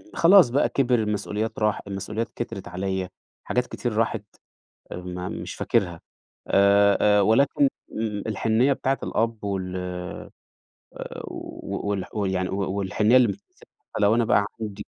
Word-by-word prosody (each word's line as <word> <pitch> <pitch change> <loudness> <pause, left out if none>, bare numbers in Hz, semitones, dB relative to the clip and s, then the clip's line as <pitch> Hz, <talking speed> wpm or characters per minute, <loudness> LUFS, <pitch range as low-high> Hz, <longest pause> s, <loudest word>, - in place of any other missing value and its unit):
خلاص 175 -5 +7
بقى 140 +4 +2
كِبِر 130 -2 +2
المسؤوليات 105 +1 -2
راح 105 -1 +1
المسؤوليات 105 +4 -4
كترت 100 -5 -5
عليَّ، 95 +1 -2 0.4
حاجات 125 0 0
كتير 120 -2 -3
راحت، 115 -2 0 0.7
آآ، - - -4
ما 90 0 -5
مش - - -6
فاكرها 90 -7 0 0.5
آآ، 100 +1 +5 0.2
آآ، - - +5
ولكن 135 +6 +4 0.2
مم 105 -2 -3
الحنية 110 +5 +2
بتاعت 135 0 -1
الأب 115 -1 -1
وال 95 -2 -3
آآ، 90 -1 -6 1.0
و - - -6
والح 100 +1 -3
ويعني 95 -3 -1
و 95 -1 -2
والحنية 105 +4 +3
اللي 125 -2 +5
مش 100 - -2
هانساها 100 - -24 0.3
حتى - - 0
لو 105 +2 +5
أنا 120 - +2
بقى 100 -2 +3 0.2
عندي 105 -3 -5
105 Hz, 150 wpm, -25 LUFS, 95-115 Hz, 1.0 s, خلاص